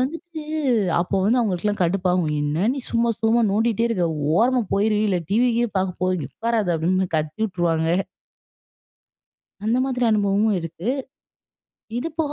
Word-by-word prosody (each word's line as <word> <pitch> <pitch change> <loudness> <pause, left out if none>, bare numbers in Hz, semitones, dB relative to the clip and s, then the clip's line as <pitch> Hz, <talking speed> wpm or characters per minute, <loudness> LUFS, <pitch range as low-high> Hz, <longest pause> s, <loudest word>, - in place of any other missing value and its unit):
வந்துட்டு 330 +5 -4 0.6
அப்போ 185 +3 -1
வந்து 235 +5 +3
அவுங்களுக்கெல்லாம் 205 -2 0
கடுப்பாகும். 180 -2 +1
என்ன 150 +7 0
நீ - - -4
சும்மா 235 0 +2
சும்மா 230 +1 +3
நோண்டிகிட்டே 225 +2 +1
இருக்க. 180 -7 0 0.3
ஓரமா 250 +1 +3
போயிரு. 210 +1 +2
இல்ல 185 -3 +1
டிவி 240 +4 +3
கீவி 240 -2 +1
பார்க்க 185 -1 -2
போ 185 - +2 0.2
உட்காராத 225 -3 -1
அப்டின்னு 185 +4 +1
கத்தி 155 +2 -3
வுட்டுருவாங்க. 170 -5 0 1.8
அந்த 230 +3 +2
மாதிரி 250 -2 -1
அனுபவமும் 205 0 +2
இருக்கு. 165 +5 -5 1.1
இது 245 +7 -2
போக 290 -2 -1
210 Hz, 135 wpm, -22 LUFS, 180-235 Hz, 1.8 s, வந்து